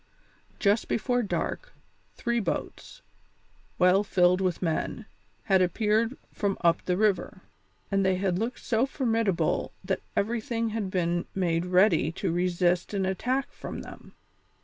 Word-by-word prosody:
Just 205 +2 +2
before 245 +2 0
dark, - - -3 0.4
three 235 0 0
boats, 195 -7 -5 0.7
well 180 +3 +4
filled 180 -2 +3
with 185 -2 0
men, 180 +6 -2 0.4
had 190 -3 +3
appeared 220 +6 +1 0.2
from 200 -2 -1
up 170 -1 +3
the 180 -1 0
river, 210 -2 0 0.5
and 195 0 +2
they 190 0 +3
had 185 -1 0
looked 235 +3 -4
so 235 +3 +2
formidable 225 - 0
that - - -1
everything 230 +1 -1
had 215 -3 -3
been 175 -1 -1
made 175 -2 0
ready 180 -4 +4
to - - -2
resist 180 +2 +1
an 195 -1 0
attack 250 +8 -1
from - - -7
them. - - -12
195 Hz, 135 wpm, -27 LUFS, 180-225 Hz, 0.7 s, well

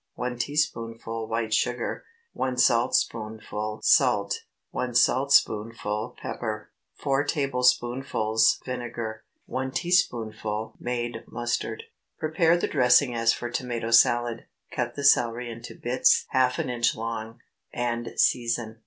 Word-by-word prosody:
1 125 -1 -4
teaspoonful 115 -5 -2
white 115 -1 -2
sugar. 120 +1 -1 0.3
1 130 -1 -2
saltspoonful 110 -3 0
salt. 105 -7 +3 0.3
1 125 -1 -3
saltspoonful 115 -4 +2
pepper. 110 -2 -5 0.2
4 140 -1 0
tablespoonfuls 125 -5 +1
vinegar. 120 -3 -5 0.2
1 130 +1 -3
teaspoonful 110 -9 -1
made 120 -2 -3
mustard. 120 - -3 0.3
Prepare 165 +1 +2
the - - -1
dressing 125 -1 +4
as 115 0 +3
for 120 0 -4
tomato 120 -2 -3
salad; 120 0 +3 0.3
cut 120 -1 -2
the 140 - -5
celery 120 -3 +3
into 115 +1 -9
bits 120 +2 +2
half 130 -1 +2
an 125 - -2
inch 120 -1 +1
long, 115 0 -5 0.3
and 120 -1 -2
season. 115 -2 +1
120 Hz, 110 wpm, -26 LUFS, 115-125 Hz, 0.3 s, dressing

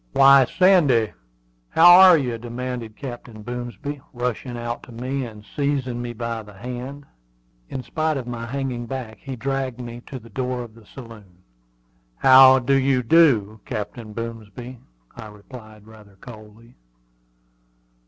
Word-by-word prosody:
"Why, 135 -1 +7
Sandy, 145 - +3 0.6
how 175 +2 +7
are 185 -3 +8
you?" 125 -5 -3
demanded 120 -1 -6
Captain 120 -4 -9
Boomsby, 125 +4 -6
rushing 120 0 -4
out 120 0 -5
to - - -14
me 130 +3 -4
and 105 -2 -13
seizing 135 -4 -1
me 120 0 -5
by 115 0 -4
the 105 -2 -15
hand. 125 +6 -7 0.6
In 130 - -5
spite 155 +1 -1
of 130 - -5
my 120 -1 -6
hanging 125 -2 -4
back, 115 -4 -6
he 135 -2 -7
dragged 135 0 -3
me 120 -1 -8
to 135 - -7
the 115 -2 -14
door 125 -1 -3
of 115 -2 -12
the 115 -2 -18
saloon. 105 -8 -13 0.7
"How 130 - +7
do 130 +1 0
you 135 -1 +2
do, 115 -8 +3
Captain 110 +2 -6
Boomsby?" 115 +2 -8 0.4
I 110 - -9
replied 110 0 -13 0.4
coldly. 110 0 -14
120 Hz, 140 wpm, -22 LUFS, 115-135 Hz, 0.7 s, are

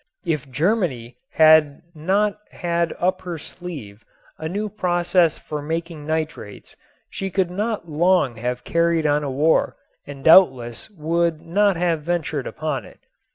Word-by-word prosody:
If 150 -5 -2
Germany 150 - -1
had 155 - +5
not 195 +6 0
had 170 -1 -1
up 185 +1 0
her 175 -2 -5
sleeve 140 - -9 0.4
a 160 - -4
new 205 +4 -2
process 175 -4 +1
for 150 -1 -6
making 160 0 -5
nitrates 155 -9 -4 0.3
she 195 - -5
could 185 -1 0
not 210 0 -3
long 160 -5 +2
have 125 +2 -3
carried 170 -1 +1
on 150 0 +2
a 140 - -2
war 150 +5 +1 0.3
and 140 -1 -9
doubtless 130 -9 +5
would 170 -2 -1
not 195 +4 +2
have 170 -2 0
ventured 160 -4 -2
upon 155 -3 -3
it. - - -16
165 Hz, 140 wpm, -22 LUFS, 150-180 Hz, 0.4 s, had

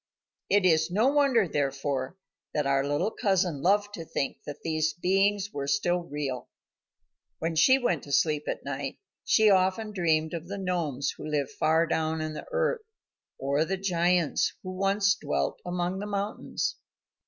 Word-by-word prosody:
It 205 -1 +4
is 160 -2 +4
no 215 +8 +3
wonder, 275 -8 +3
therefore, 140 +1 -2 0.4
that 150 -2 +1
our 140 0 +2
little 145 +9 0
cousin 185 - 0
loved 205 +4 +2
to 170 - -6
think 140 -3 -3
that 145 0 -7
these 155 -1 0
beings 195 +3 +1
were 140 -1 -3
still 160 +6 +1
real. 140 -5 -4 0.9
When 165 +1 -2
she 260 +12 +6
went 210 - 0
to 140 - -9
sleep 150 +1 +2
at - - -4
night, 140 -1 -4 0.3
she 215 -1 +5
often 190 +3 +2
dreamed 160 -5 +1
of 170 0 -5
the 200 +2 -5
gnomes 165 -8 -1
who - - -8
live 150 -2 -1
far 160 +2 +2
down 160 0 -1
in 155 0 -3
the - - -8
earth, - - 0 0.6
or 140 +3 +1
the 190 +4 -2
giants 175 -3 +1
who 185 - -5
once 195 +2 +2
dwelt 70 - -2
among 180 +1 -2
the 205 - -4
mountains. 205 +1 -2
170 Hz, 165 wpm, -28 LUFS, 145-195 Hz, 0.9 s, she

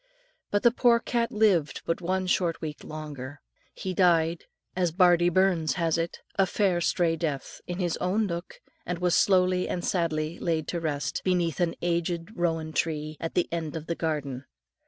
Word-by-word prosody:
But 205 - 0
the 240 - +6
poor 235 -1 +4
cat 235 -1 -1
lived 195 -9 +2
but 165 +2 -1
one 185 +2 0
short 175 -2 +1
week 155 -2 -6
longer. 145 -3 -7 0.4
He 185 - -4
died, 170 -2 +3 0.3
as 180 -2 +1
bardie 175 0 +5
Burns 175 -5 +2
has 165 0 +1
it, 165 0 -3 0.2
"a 190 - +5
fair 185 -3 +1
strae 165 -1 +2
death" 155 -5 -4
in 175 -1 -4
his 175 -3 -1
own 200 +4 +1
nook, 170 -2 -5 0.2
and 180 0 -3
was 180 -1 +2
slowly 185 -1 +3
and 175 - -2
sadly 160 -2 -1
laid 160 -3 -1
to 175 - -1
rest, 150 -3 -2
beneath 175 -4 +1
an 175 -2 +1
aged 170 +3 -1
rowan 165 -2 -1
tree 155 -1 -1
at 165 - -4
the 175 - +2
end 165 -2 -3
of 160 -1 -5
the 170 - -1
garden. 145 -6 -3
170 Hz, 175 wpm, -27 LUFS, 160-180 Hz, 0.4 s, the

